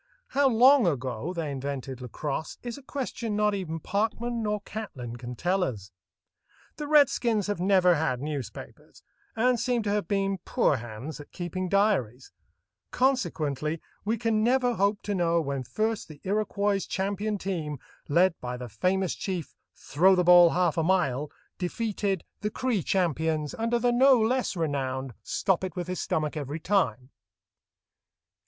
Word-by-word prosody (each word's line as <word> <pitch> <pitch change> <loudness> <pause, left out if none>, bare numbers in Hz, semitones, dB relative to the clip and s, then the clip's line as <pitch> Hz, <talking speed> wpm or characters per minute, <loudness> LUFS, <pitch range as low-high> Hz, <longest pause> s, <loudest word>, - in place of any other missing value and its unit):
How 275 0 +3
long 255 0 +6
ago 130 0 -2
they 165 -5 -3
invented 135 -1 -5
lacrosse 140 +5 -4
is 240 -1 -5
a 280 - -11
question 250 -5 -4
not 210 0 +2
even 170 -5 -3
Parkman 225 +6 -1
nor 210 -1 -1
Catlin 135 - -7
can 120 0 -7
tell 180 +8 +1
us. 100 - -4 0.9
The 300 - -4
redskins 245 -8 +3
have 205 -3 -2
never 185 -1 +4
had 145 -6 0
newspapers, 145 -3 -7 0.3
and 245 +1 +2
seem 245 -1 0
to 205 - -1
have 205 0 0
been 195 -1 0
poor 175 - +1
hands 120 +7 -7
at 145 - -12
keeping 180 +1 -4
diaries; 185 - +1 0.6
consequently 165 - 0 0.2
we 220 +3 0
can 225 -2 +1
never 250 +1 +3
hope 200 -1 +1
to 205 - -2
know 170 -3 +2
when 140 -4 -2
first 215 - -2
the 155 -2 -12
Iroquois 205 0 0
champion 205 +2 -2
team, 165 -7 -3 0.3
led 175 +4 +4
by 125 0 -4
the 125 -1 -7
famous 185 - 0
chief 180 -5 -4 0.2
"Throw 185 +7 +3
the 180 - +2
ball 175 -1 +8
half 175 -2 +1
a - - +2
mile," 150 -6 +1 0.3
defeated 200 -1 -2 0.2
the 210 - -2
Cree 235 -2 -1
champions 160 -4 0
under 230 +1 0
the 240 +1 +2
no 260 +1 +6
less 245 0 +1
renowned 135 -5 -2
"Stop 190 -2 0
it 185 -4 -4
with 180 -1 -4
his 185 0 -3
stomach 155 -1 -1
every 150 +1 -4
time." 135 - 0
185 Hz, 155 wpm, -27 LUFS, 150-215 Hz, 0.9 s, ball